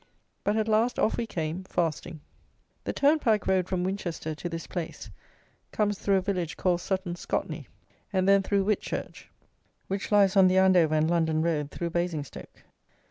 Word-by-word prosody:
But 210 Hz, +2 st, +1 dB
at 220 Hz, 0 st, 0 dB
last 225 Hz, +3 st, +2 dB
off 220 Hz, -, +2 dB
we 235 Hz, -, -3 dB
came, 165 Hz, -1 st, -3 dB
fasting. 170 Hz, -2 st, -2 dB, 0.6 s
The -, -, -1 dB
turnpike 280 Hz, -8 st, +2 dB
road 185 Hz, -2 st, +2 dB
from 185 Hz, -2 st, -1 dB
Winchester 175 Hz, -4 st, -3 dB
to 165 Hz, +3 st, -5 dB
this 165 Hz, 0 st, -5 dB
place 175 Hz, -3 st, -6 dB, 0.6 s
comes 205 Hz, -2 st, 0 dB
through 200 Hz, -, +2 dB
a 190 Hz, -, +3 dB
village 180 Hz, -4 st, -2 dB
called 175 Hz, -2 st, +1 dB
Sutton 185 Hz, -2 st, -2 dB
Scotney, 175 Hz, -, -4 dB, 0.4 s
and 190 Hz, -1 st, +1 dB
then 195 Hz, 0 st, +6 dB
through 200 Hz, 0 st, +1 dB
Whitchurch, 210 Hz, -1 st, -3 dB, 0.6 s
which 195 Hz, +2 st, -4 dB
lies 200 Hz, -1 st, +4 dB
on 190 Hz, -1 st, +7 dB
the 185 Hz, +1 st, +3 dB
Andover 180 Hz, -5 st, +5 dB
and 155 Hz, 0 st, +2 dB
London 160 Hz, -2 st, +1 dB
road, 150 Hz, -4 st, 0 dB
through 170 Hz, +2 st, -4 dB
Basingstoke. 170 Hz, -5 st, -4 dB
185 Hz, 165 wpm, -27 LUFS, 170-200 Hz, 0.6 s, on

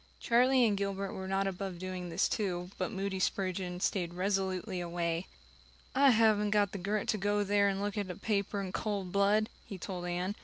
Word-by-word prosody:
Charlie 250 Hz, +1 st, +4 dB
and 210 Hz, -3 st, +2 dB
Gilbert 195 Hz, 0 st, -2 dB
were 190 Hz, 0 st, -5 dB
not 195 Hz, +1 st, +1 dB
above 190 Hz, -1 st, -3 dB
doing 185 Hz, 0 st, -5 dB
this 170 Hz, +3 st, +2 dB
too, 180 Hz, -3 st, -2 dB
but -, -, -1 dB
Moody 195 Hz, -2 st, -2 dB
Spurgeon 185 Hz, -1 st, -1 dB
stayed 175 Hz, -2 st, -1 dB
resolutely 190 Hz, 0 st, -1 dB
away. 170 Hz, 0 st, -2 dB, 0.7 s
"I 275 Hz, +1 st, +6 dB
haven't 215 Hz, -3 st, +4 dB
got 205 Hz, -1 st, +2 dB
the 200 Hz, -, -5 dB
grit 200 Hz, +3 st, -1 dB
to 215 Hz, -, +1 dB
go 205 Hz, +1 st, +1 dB
there 200 Hz, 0 st, +3 dB
and 195 Hz, 0 st, -2 dB
look 205 Hz, 0 st, -2 dB
at 200 Hz, -2 st, -3 dB
a 180 Hz, -, -4 dB
paper 200 Hz, 0 st, -1 dB
in 190 Hz, -2 st, -3 dB
cold 200 Hz, -3 st, -2 dB
blood," 205 Hz, +2 st, +3 dB, 0.2 s
he 195 Hz, -, -8 dB
told 180 Hz, -1 st, -5 dB
Anne. 180 Hz, +3 st, -1 dB
195 Hz, 195 wpm, -32 LUFS, 185-205 Hz, 0.7 s, I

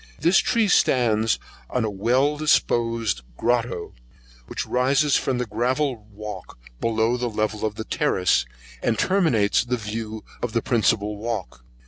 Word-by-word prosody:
This 175 Hz, +3 st, +4 dB
tree 230 Hz, -3 st, +2 dB
stands 115 Hz, -, +3 dB, 0.3 s
on 125 Hz, -3 st, 0 dB
a -, -, -1 dB
well 125 Hz, +9 st, +2 dB
disposed 115 Hz, -, +1 dB, 0.2 s
grotto, 120 Hz, -7 st, -1 dB, 0.5 s
which -, -, -4 dB
rises 135 Hz, +3 st, +2 dB
from 130 Hz, -2 st, 0 dB
the 125 Hz, -, -1 dB
gravel 120 Hz, +1 st, -1 dB
walk 105 Hz, 0 st, -8 dB, 0.2 s
below 115 Hz, 0 st, +1 dB
to -, -, -9 dB
the 120 Hz, 0 st, -1 dB
level 110 Hz, -1 st, -2 dB
of 110 Hz, -1 st, -1 dB
the 110 Hz, -, -4 dB
terrace, 90 Hz, -9 st, +1 dB, 0.3 s
and 115 Hz, -, +1 dB
terminates 155 Hz, -, +2 dB
the 125 Hz, +1 st, -1 dB
view 110 Hz, 0 st, -5 dB, 0.2 s
of 120 Hz, -2 st, -3 dB
the 115 Hz, -, +1 dB
principal 105 Hz, -3 st, +1 dB
walk. 100 Hz, -, -5 dB
115 Hz, 145 wpm, -24 LUFS, 105-125 Hz, 0.5 s, This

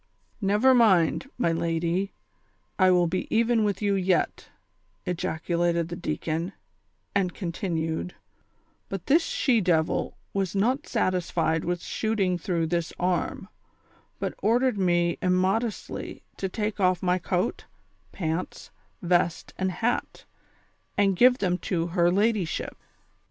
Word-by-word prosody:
"Never 210 Hz, +6 st, +4 dB
mind, 220 Hz, 0 st, +4 dB
my 240 Hz, -9 st, +2 dB
lady, 170 Hz, +3 st, -1 dB, 0.7 s
I 185 Hz, -1 st, +6 dB
will 180 Hz, -1 st, +4 dB
be 180 Hz, +2 st, -2 dB
even 230 Hz, 0 st, +3 dB
with 205 Hz, -1 st, -1 dB
you 200 Hz, -1 st, +2 dB
j'et," 190 Hz, -1 st, 0 dB, 0.6 s
ejaculated 170 Hz, -1 st, -1 dB
the 170 Hz, -, -4 dB
deacon; 165 Hz, +1 st, -3 dB, 0.6 s
and 190 Hz, -3 st, 0 dB
continued: 170 Hz, -2 st, -3 dB, 0.4 s
" -, -, -42 dB
But 195 Hz, -3 st, -5 dB
this 315 Hz, +5 st, +5 dB
she 245 Hz, -8 st, +1 dB
devil 165 Hz, -4 st, +1 dB, 0.2 s
was 195 Hz, -1 st, -1 dB
not 255 Hz, -, +1 dB
satisfied 175 Hz, -6 st, 0 dB
witli 175 Hz, +1 st, -2 dB
shooting 195 Hz, -5 st, 0 dB
through 170 Hz, -2 st, -1 dB
this 170 Hz, 0 st, -1 dB
arm, 180 Hz, +1 st, -1 dB, 0.7 s
but -, -, -3 dB
ordered 240 Hz, 0 st, +2 dB
me 175 Hz, -2 st, +2 dB
immodestly 190 Hz, +5 st, -1 dB
to 190 Hz, -, -2 dB
take 210 Hz, +2 st, -3 dB
off 185 Hz, -2 st, +2 dB
my 180 Hz, 0 st, +2 dB
coat, 180 Hz, +4 st, -1 dB, 0.5 s
pants, 165 Hz, 0 st, -4 dB, 0.3 s
vest 175 Hz, -1 st, +1 dB
and 190 Hz, 0 st, -1 dB
hat, 230 Hz, +6 st, -2 dB, 0.7 s
and 195 Hz, -2 st, +3 dB
give 250 Hz, +5 st, +6 dB
them 180 Hz, -4 st, 0 dB
to 170 Hz, -3 st, -1 dB
her 175 Hz, -2 st, +4 dB
ladyship. 205 Hz, -3 st, 0 dB
185 Hz, 125 wpm, -26 LUFS, 170-205 Hz, 0.7 s, I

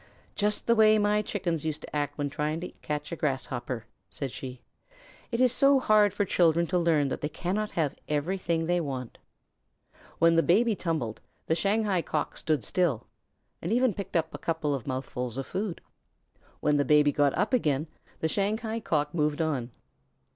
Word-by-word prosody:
"Just 210 Hz, 0 st, 0 dB
the 235 Hz, -, +4 dB
way 215 Hz, -1 st, +6 dB
my 210 Hz, 0 st, +2 dB
Chickens 175 Hz, -7 st, -2 dB
used 155 Hz, -1 st, -3 dB
to -, -, -8 dB
act 145 Hz, -1 st, -1 dB
when 145 Hz, -1 st, -1 dB
trying 150 Hz, +2 st, -2 dB
to 180 Hz, -, -5 dB
catch 150 Hz, +1 st, -4 dB
a -, -, -2 dB
Grasshopper," 130 Hz, -5 st, -3 dB, 0.2 s
said 140 Hz, -3 st, -3 dB
she. 130 Hz, -1 st, -7 dB, 0.7 s
"It 235 Hz, -, -1 dB
is 255 Hz, -1 st, +5 dB
so 275 Hz, +2 st, +5 dB
hard 210 Hz, -4 st, +4 dB
for 205 Hz, -, 0 dB
children 170 Hz, -2 st, +3 dB
to 180 Hz, -, +4 dB
learn 160 Hz, -5 st, +2 dB
that -, -, -4 dB
they 150 Hz, -, -1 dB
cannot 195 Hz, +7 st, -2 dB
have 150 Hz, -4 st, 0 dB, 0.2 s
everything 165 Hz, +2 st, 0 dB
they 175 Hz, +1 st, +1 dB
want." 130 Hz, -6 st, -5 dB, 1.0 s
When 165 Hz, 0 st, +5 dB
the -, -, +6 dB
Baby 215 Hz, +7 st, +3 dB
tumbled, 155 Hz, -, -3 dB, 0.2 s
the -, -, +1 dB
Shanghai 200 Hz, +2 st, +1 dB
Cock 155 Hz, -2 st, -2 dB
stood 155 Hz, -7 st, 0 dB
still, 160 Hz, -, 0 dB, 0.6 s
and -, -, -3 dB
even 245 Hz, 0 st, +3 dB
picked 195 Hz, -1 st, -7 dB
up 160 Hz, -1 st, +1 dB
a -, -, -6 dB
couple 160 Hz, -3 st, -1 dB
of 135 Hz, -2 st, -4 dB
mouthfuls 130 Hz, -2 st, -4 dB
of 135 Hz, -, -3 dB
food. 195 Hz, -3 st, -3 dB, 0.8 s
When 150 Hz, 0 st, +3 dB
the 145 Hz, -, +3 dB
Baby 150 Hz, +1 st, +5 dB
got 145 Hz, -1 st, +2 dB
up 215 Hz, +5 st, 0 dB
again, 150 Hz, -, +2 dB, 0.4 s
the 160 Hz, -, +2 dB
Shanghai 220 Hz, +5 st, -1 dB
Cock 150 Hz, -8 st, -1 dB
moved 150 Hz, -3 st, 0 dB
on. 145 Hz, -7 st, -1 dB
165 Hz, 180 wpm, -28 LUFS, 145-200 Hz, 1.0 s, way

